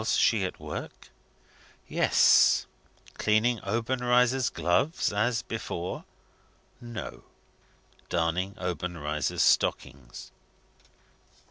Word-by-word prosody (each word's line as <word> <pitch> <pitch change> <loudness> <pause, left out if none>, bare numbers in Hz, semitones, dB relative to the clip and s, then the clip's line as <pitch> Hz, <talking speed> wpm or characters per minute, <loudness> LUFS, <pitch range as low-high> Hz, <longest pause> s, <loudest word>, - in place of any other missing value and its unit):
Was 110 - 0
she 110 -4 +3
at 90 - -6
work? - - -8 0.8
Yes. - - +4 0.5
Cleaning 110 +2 +2
Obenreizer's 125 +3 +1
gloves, 115 - 0
as 115 +3 0
before? 90 -6 -5 0.8
No; 120 -2 -7 0.9
darning 90 +3 -1
Obenreizer's 85 -4 -2
stockings. 65 -3 0
105 Hz, 75 wpm, -27 LUFS, 90-120 Hz, 0.9 s, Yes